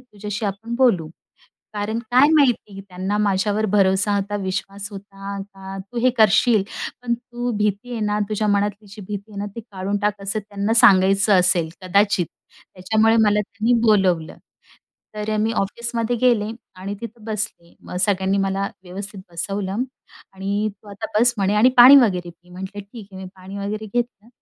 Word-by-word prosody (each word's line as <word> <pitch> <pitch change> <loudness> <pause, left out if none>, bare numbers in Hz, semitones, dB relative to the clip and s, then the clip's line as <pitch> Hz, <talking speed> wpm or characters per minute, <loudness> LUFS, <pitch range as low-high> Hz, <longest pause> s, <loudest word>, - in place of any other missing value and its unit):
तुझ्याशी 210 -2 -6
आपण 225 +4 -4
बोलू." 210 -12 +3 0.7
कारण 210 +2 -2
काय 260 +4 +6
माहिती 245 -9 +2
त्यांना 190 +2 -3
माझ्यावर 205 +1 +1
भरोसा 200 0 +2
होता, 205 +1 -2
विश्वास 195 +2 -4
होता 200 0 -8
का 195 -1 -10
तू 200 +5 -7
हे 255 +1 +4
करशील. 220 0 +4 0.4
पण 235 -1 0
तू 240 0 -5
भीती 210 +3 -1
आहे 230 - -3
ना, 210 0 0
तुझ्या 215 0 -1
मनातली 205 +1 0
जी 205 +2 -11
भीती 205 +1 -6
आहे 200 - -8
ना 205 - -3
ती 230 - -6
काढून 195 +1 -2
टाक, 210 -1 0
असं 200 +2 -2
त्यांना 205 +1 -3
सांगायचं 195 0 +5
असेल 175 -2 +3
कदाचित. 195 -1 +2 0.5
त्याच्यामुळे 220 +4 +2
मला 210 0 +3
त्यांनी 215 +3 -1
बोलवलं. 185 -6 +2 0.8
तर 210 +1 -3
अ, 215 - 0
मी 220 +2 +1
ऑफिसमध्ये 235 +3 -2
गेले 235 -4 +3 0.3
आणि 195 +2 -5
तिथं 230 -1 -9
बसले. 210 -6 -5
मग 180 - -8
सगळ्यांनी 190 -1 +1
मला 195 0 0 0.2
व्यवस्थित 195 +2 -7
बसवलं. 195 +5 -2 0.5
"आणि 200 +2 -1
तू 210 - -15
आता 205 +2 -6
बस." 245 +1 +4
म्हणे, 200 +1 +1
"आणि 220 +5 +5
पाणी 250 +3 +10
वगैरे 180 -9 +3
पी." 175 +1 -24
म्हटलं, 190 +3 -7
"ठीक 205 +1 -12
आहे." 190 0 -8
मी 185 - -7
पाणी 190 +2 -9
वगैरे 210 +2 -4
घेतलं 240 -2 -3
205 Hz, 165 wpm, -21 LUFS, 195-220 Hz, 0.8 s, पाणी